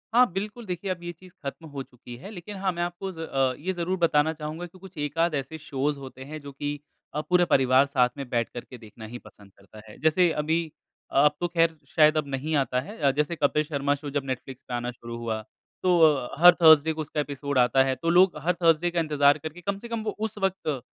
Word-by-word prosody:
हाँ 250 -6 +6
बिल्कुल, 210 +5 -5
देखिए 185 +1 -3
अब 175 -1 -5
ये 175 - -4
चीज़ 180 +1 -17
खत्म 160 +4 -6
हो 135 - -3
चुकी 120 -1 -12
है, 195 - -10
लेकिन 205 +1 -8
हाँ 190 -1 0
मैं 175 0 -4
आपको 175 +2 -4
ज़ 165 - -12
अ, 135 -5 0
ये 185 +4 -2
ज़रूर 180 +2 -2
बताना 160 -2 +2
चाहूँगा 155 +3 -6
कि 175 +2 -14
कुछ 190 -2 -14
एकाध 155 +2 0
ऐसे 140 +3 -4
शोज़ 145 -1 -2
होते 130 -1 -10
हैं 155 - -5
जो 140 0 -9
की 145 +1 -4 0.4
अ, 150 - -1
पूरे 180 +2 +3
परिवार 130 -1 +4
साथ 125 -3 +2
में 135 -2 -5
बैठ 120 -2 0
करके 120 +1 -8
देखना 110 0 -12
ही 120 +3 -7
पसंद 100 -1 -16
करता 105 +2 -15
है। - - -13
जैसे 160 +4 +3
अभी 160 +3 0 0.5
अ 135 - +4
अब 150 - +6
तो 175 - 0
खैर 165 -1 +2 0.2
शायद 155 -1 +5
अब 145 -2 0
नहीं 140 +3 -2
आता 130 -2 +1
है 205 +11 -10
अ, 140 -3 +3
जैसे 150 +4 -1
कपिल 150 0 +2
शर्मा 145 -1 0
शो 145 0 -7
जब 140 -1 -2
नेटफ्लिक्स 130 0 -6
पे 125 - -6
आना 120 0 -2
शुरू 120 -1 -9
हुआ 110 -2 -3 0.4
तो 180 -2 +4
अ, 145 -6 +3
हर 180 0 +10
थर्सडे 160 -1 +7
को 155 - -4
उसका 150 0 -4
एपिसोड 140 -1 -4
आता 130 +2 +4
है 135 -1 0
तो 165 +6 -2
लोग 180 -1 +5
हर 180 - +2
थर्सडे 165 +1 +4
का 170 - 0
इंतज़ार 145 -2 +3
करके, 155 +3 -8
कम 200 +2 -2
से 235 - -9
कम 230 -1 -3
वो 215 - -3
उस 215 -1 -3
वक्त 190 -9 -1
150 Hz, 245 wpm, -26 LUFS, 135-175 Hz, 0.5 s, हर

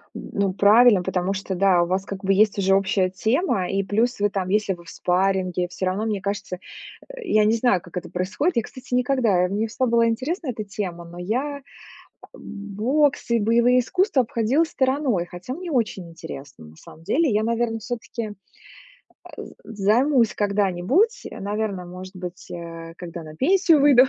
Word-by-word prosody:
Ну 200 -2 -2
правильно. 205 0 +6
Потому 185 +1 -1
что 195 -1 -4
да, 185 -2 +4
у - - -2
вас 190 +2 -1
как 195 -1 -7
бы 195 0 +3
есть 210 +1 +3
уже 195 -1 +3
общая 195 -1 +1
тема, 220 - 0
и 195 0 0
плюс 225 +5 0
вы 205 0 +2
там, 195 -2 -3
если 210 0 +1
вы 175 -1 -12
в - - -11
спарринге, 185 0 0
всё 185 - -4
равно, 190 +4 -1
мне 210 -3 -2
кажется, 200 -1 -3 0.5
э, - - -9
я 215 -9 +4
не 215 - +3
знаю, 230 -5 +2
как 175 +1 -10
это 180 - -5
происходит. 205 - -1
Я, 230 - +2
кстати, 255 +2 -10
никогда, 245 -7 +2
э, - - 0
мне 210 +3 -1
всегда 255 +3 -1
была 230 0 +3
интересна 270 - -2
эта 225 -3 -3
тема, 190 -4 -5
но 170 +1 -12
я, 260 +10 -2
э, - - -21 0.8
бокс 235 +8 -1
и 235 - +3
боевые 235 +3 +4
искусства 360 - +2
обходила 235 +6 +1
стороной, 260 - 0
хотя 180 +8 -7
мне 350 +3 -6
очень 215 - -1
интересно. 145 - -10
На 75 +1 -15
самом 160 - -15
деле, 285 - +2
я, 210 +1 +2
наверно, 230 0 0
всё-таки, 230 -1 -5 1.1
э, - - -6 0.2
з 215 -3 -8
займусь 250 -2 +3
когда-нибудь, 205 - +1
э, - - -9
наверно, 200 -2 -3
может 185 +2 -10
быть, 180 -1 -8
а, 165 -1 -8
когда 170 -1 -7
на 155 0 -11
пенсию 335 - +4
выйду. 275 -3 +7
205 Hz, 185 wpm, -23 LUFS, 185-245 Hz, 1.1 s, выйду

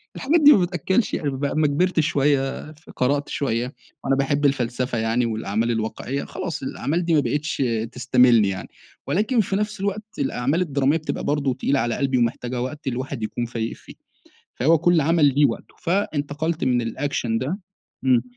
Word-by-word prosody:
الحاجات 315 +4 +2
دي 295 0 +9
ما - - +5
بتأكلش 185 +5 0
عيش - - -4
بقى 140 +1 -2
لمّا 155 -1 +3
كبرت 170 +4 +1
شويّة 140 0 +1
ف 155 +1 -19
قرأت 140 +3 0
شويّة، 125 -2 -2 0.3
وأنا 135 0 +2
باحب 140 +1 0
الفلسفة 125 -2 0
يعني 115 +2 +1
والأعمال 110 +1 -1
الواقعيّة، 115 +5 -3
خلاص - - -5
الأعمال 165 +4 -2
دي 170 - +1
ما 150 - +5
بقتش 145 +2 -1 0.3
تستميلني 125 -4 +4
يعني، 95 -1 -5 0.4
ولكن 220 +5 +2
في 195 0 -2
نفس 210 0 -2
الوقت 200 +2 -2 0.2
الأعمال 140 +5 0
الدرامية 140 -2 +1
بتبقى 155 - -4
برضو 145 -3 0
تقيلة 135 +2 0
على 120 0 0
قلبي 135 -2 0
ومحتاجة 120 +1 -1
وقت 140 +3 -5
الواحد 130 -1 -3
يكون 120 +2 -2
فايق 115 -1 -3
فيه، - - -14 0.6
فهو 160 +6 +4
كل 170 0 +3
عمل 160 0 +3
ليه 145 0 +5
وقته، 115 - -3
فانتقلت 160 -3 -1
من 125 -2 +2
الأكشن 115 -1 -2
ده، 155 - -3 0.5
امم. 125 -2 +4
140 Hz, 170 wpm, -23 LUFS, 125-160 Hz, 0.6 s, دي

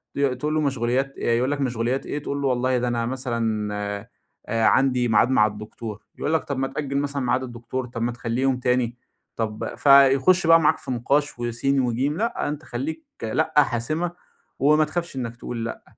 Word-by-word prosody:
ت - - -4 0.2
تقول 150 +3 -1
له 155 - +2
مَشغوليات 135 0 0
آآ 115 - +1
يقول 125 +4 +1
لك 145 -1 -2
مشغوليات 125 +1 -1
إيه؟ 145 - -3
تقول 140 0 -3
له 140 - +1
والله 130 0 +1
ده 125 0 -1
أنا 120 -1 0
مثلًا 115 -4 -2 0.8
آآ 115 -1 +1
عندي 130 -2 +3
ميعاد 110 +2 +4
مع 105 -5 +4
الدكتور. 105 +1 -7
يقول 155 - -2
لك 160 - +2
طب 140 - -4
ما 135 0 0
تأجِل 140 -1 -3
مثلًا 140 0 -1
ميعاد 125 +1 +1
الدكتور، 125 +1 -5
طب 115 -1 -6
ما 120 +1 0
تخليه 120 +1 -3
يوم 135 -1 +2
تاني. 125 -1 0 0.4
طَب 110 -2 -3
فيخش 140 +5 +5
بقى 165 0 +8
معاك 155 - +3
في - - -6
نِقاش 135 +3 0
وسين 120 +3 0
وجيم، 130 +5 0
لأ، 230 +3 -1
أنتَ 150 +1 -5
خليك 320 +2 -5 0.2
لأ، 160 +8 0
حاسمة، 155 +8 -2 0.5
وما 150 +2 +4
تخافش 170 0 -4
إنك 120 -3 -4
تقول 115 -1 -5
لأ. 115 - -6
130 Hz, 190 wpm, -24 LUFS, 120-140 Hz, 0.8 s, بقى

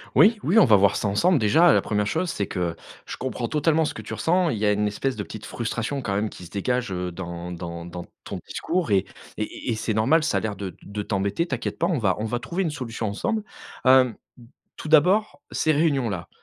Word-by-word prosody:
Oui. 215 +1 +6
Oui, 185 +8 +2
on - - +7
va 110 - +6
voir 100 0 +4
ça - - -1
ensemble. 155 - +3
Déjà, 125 +11 +5
heu, - - +5
la - - +4
1re 105 -1 -1
chose, 165 - -1
c'est 100 - -2
que 85 -3 -2 0.3
je - - -7
comprends 125 -2 -3
totalement 155 +2 +2
ce - - -3
que - - -7
tu - - -7
ressens. 175 +1 +2
Il 115 - -1
y 105 - 0
a 105 - +4
une 105 0 +1
espèce 125 +6 -2
de - - -4
petite 110 - -9
frustration, 120 +4 -3
quand 105 -6 -2
même, 105 +2 0
qui 90 - -11
se - - -12
dégage, 120 +3 -1
heu, 90 -1 -3
dans 85 -1 -6
dans 85 -1 -6
dans 85 0 -7 0.2
ton - - -6
discours 175 -6 -2
et 95 -1 +3 0.3
et 110 - 0
et 110 - -5
et - - 0
c'est 110 0 -2
normal. 135 +10 +3
Ça 160 - +1
a - - +2
l'air 105 -2 -3
de 95 -3 -6
de 105 +1 -5
t'embêter. 100 - -1
T'inquiètes 130 -7 -3
pas, 170 - +2
on 175 - +1
va 100 -7 +1
on 110 - -2
va 120 +2 -2
trouver 175 +8 -2
une 165 - -1
solution 120 -5 -4
ensemble. 215 - -2 0.4
Hem, 130 -2 +6 0.6
tout - - -7
d'abord, 160 +2 +4
ces 155 - +1
réunions-là, 135 - 0
115 Hz, 245 wpm, -24 LUFS, 100-155 Hz, 0.6 s, on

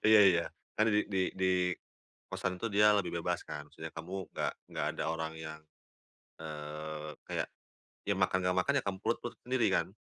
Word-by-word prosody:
Iya 110 -1 +10
iya. 85 -1 +3 0.3
Karena 110 +1 +4
di 105 - +5
di 95 - +2 0.2
di 95 - +4 0.8
kosan 90 -1 -2
tuh, 115 - 0
dia 105 +1 +7
itu 105 - +5
lebih 90 - -2
bebas, - - 0
kan? - - -5
Maksudnya, 80 0 -7
kamu 85 +3 -6 0.2
nggak - - 0 0.2
nggak - - -1
ada - - 0
orang 80 -1 -2
yang, 80 -1 -6 0.8
eee, 75 0 -5 0.2
kayak, - - -1 0.6
ya 100 - +4
makan 95 0 +3
nggak 90 0 +2
makan, 140 +10 +2
ya - - -6
kam 95 -1 -1
perut 115 - +1
perut 120 - -5
sendiri, 125 -2 +2
kan? - - +3
90 Hz, 190 wpm, -33 LUFS, 80-105 Hz, 0.8 s, Iya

